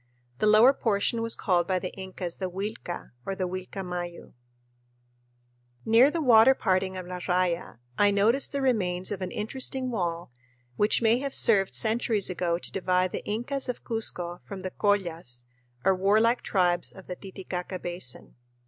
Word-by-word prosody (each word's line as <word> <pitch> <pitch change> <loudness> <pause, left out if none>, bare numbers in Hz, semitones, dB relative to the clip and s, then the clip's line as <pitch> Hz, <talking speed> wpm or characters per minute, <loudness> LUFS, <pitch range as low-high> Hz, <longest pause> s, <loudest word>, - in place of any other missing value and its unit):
The - - +2
lower 220 +5 +7
portion 225 -1 0
was 230 0 +2
called 175 -3 +1
by 185 - +1
the 185 0 -4
Incas 185 -2 -6
the 185 -1 -3
Uilca 195 -1 -5
or 195 - -3
the 185 -1 -2
Uilcamayu. 180 -1 -6 1.5
Near 230 +5 +6
the 325 +1 -2
water 240 +1 +7
parting 185 -2 0
of 185 - -6
La 180 0 -6
Raya 180 -4 -1 0.2
I 205 - +6
noticed 215 +7 +2
the 280 -1 -2
remains 185 -8 0
of 195 -2 -4
an 185 - -3
interesting 255 +4 -2
wall 170 - -3 0.4
which 210 +3 +2
may 230 +2 +4
have 275 0 -1
served 195 -4 +3
centuries 220 -3 +1
ago 175 -1 0
to - - -8
divide 185 -1 +1
the - - -4
Incas 250 +6 -3
of 250 - -4
Cuzco 180 -6 -2
from 195 -2 -8
the 185 - -4
Collas 170 -13 -1 0.4
or 195 - +5
warlike 215 +6 +3
tribes 180 -3 +1
of 190 - -13
the 180 - -6
Titicaca 185 -1 -6
Basin. 175 -8 -6
190 Hz, 160 wpm, -27 LUFS, 180-225 Hz, 1.5 s, lower